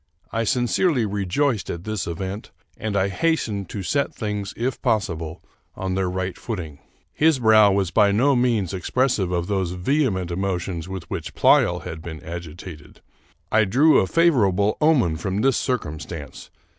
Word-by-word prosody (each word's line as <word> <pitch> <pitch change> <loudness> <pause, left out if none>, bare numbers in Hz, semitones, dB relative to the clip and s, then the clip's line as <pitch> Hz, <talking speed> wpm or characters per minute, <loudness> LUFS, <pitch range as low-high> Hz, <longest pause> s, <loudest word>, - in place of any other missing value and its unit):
I 115 0 -1
sincerely 125 - +1
rejoiced 105 +5 -1
at 85 0 -5
this 110 -2 -3
event, 95 +5 -5 0.3
and 110 -2 -3
I 95 0 +2
hastened 110 - -1
to 100 - -5
set 140 +9 -1
things, 105 -2 -3
if 125 +1 -2
possible, 85 -9 -1 0.3
on 95 -1 -3
their 95 -1 0
right 95 0 -3
footing. 85 - -6 0.3
His 160 -1 +3
brow 110 -4 +6
was 95 -2 0
by 100 +2 +4
no 130 +7 +3
means 115 -8 +1
expressive 100 0 0
of 85 -1 -1
those 95 -3 -1
vehement 95 - 0
emotions 90 -2 -3
with 95 -2 -6
which - - -5
Pleyel - - +4
had 80 0 -7
been 80 -1 -7
agitated. 85 -2 -9 0.5
I 110 0 +4
drew 140 +11 +5
a 95 - +1
favorable 105 - +3
omen 130 - +3
from 95 +4 -2
this 135 0 +3
circumstance. 80 - -4
100 Hz, 155 wpm, -23 LUFS, 90-120 Hz, 0.5 s, brow